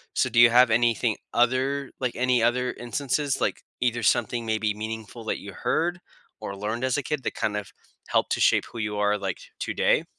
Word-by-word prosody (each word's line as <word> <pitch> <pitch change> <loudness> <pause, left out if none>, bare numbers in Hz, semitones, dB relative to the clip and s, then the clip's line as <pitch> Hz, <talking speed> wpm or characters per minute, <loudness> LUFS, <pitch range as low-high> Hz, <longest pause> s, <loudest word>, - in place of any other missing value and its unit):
So, - - +2
do 120 - +2
you 120 0 +9
have 120 0 +5
anything 115 -1 +2 0.2
other 130 +3 +1
like, 125 -2 -1
any 125 -1 +2
other 125 +2 +1
instances, 140 +3 -2
like, - - 0 0.2
either 120 -1 +1
something 115 +2 +1
maybe 110 -1 0
meaningful 110 +1 -7
that - - -2
you 100 - -9
heard, 175 +3 -1 0.4
or 100 - -6
learned 110 +5 -2
as 130 0 +1
a 145 - -2
kid 150 -2 -3
that - - -2
kind 105 -1 -1
of, 105 - -6 0.4
helped - - +1
to - - +1
shape - - +4
who 120 - -9
you 105 -1 -2
are, 105 0 +2
like, 95 -3 -3 0.2
today? - - +1
120 Hz, 200 wpm, -25 LUFS, 110-125 Hz, 0.4 s, you